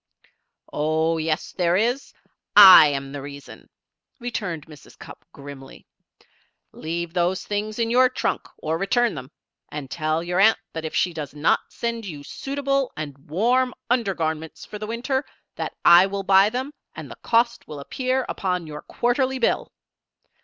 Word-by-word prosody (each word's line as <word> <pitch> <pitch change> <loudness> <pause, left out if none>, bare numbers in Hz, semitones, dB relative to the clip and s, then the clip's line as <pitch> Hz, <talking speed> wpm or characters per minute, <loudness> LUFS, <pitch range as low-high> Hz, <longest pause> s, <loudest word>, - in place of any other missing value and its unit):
"Oh, 160 +2 0
yes 155 -1 -2
there 175 -1 +1
is. 245 +6 -1 0.4
I 190 -6 +11
am 135 -1 -3
the 140 0 -6
reason," 140 0 -11 0.5
returned 200 - -4
Mrs. 150 -3 -16
Cupp, - - -12
grimly. 140 -1 -12 0.9
"Leave 170 +1 -5
those 180 +1 0
things 210 +1 -3
in 230 -1 0
your 255 +1 +5
trunk, 255 - -2
or 160 +1 -3
return 240 +4 +1
them. 130 -3 -8 0.4
And 145 -3 -7
tell 155 0 -1
your 180 +1 -1
aunt 220 +3 +5 0.2
that 160 -1 -5
if 160 - -5
she 180 - +1
does 150 -2 -7
not 150 +1 +2
send 235 -2 -4
you 150 -5 -8
suitable 275 - -2
and 150 -3 -5
warm 245 +9 +1 0.2
under 230 -6 +1
garments 160 -1 -4
for 210 - -9
the 215 - -5
winter, 255 +4 -2 0.3
that - - -5
I 175 +2 +8
will 195 0 -4
buy 195 +1 +5
them 260 +5 -4 0.2
and - - -9
the - - -8
cost 235 +1 +1
will 150 - -8
appear 255 - -2
upon 180 -3 -2
your 150 -1 -8
quarterly 260 +2 -1
bill. 240 - 0
185 Hz, 160 wpm, -23 LUFS, 155-235 Hz, 0.9 s, I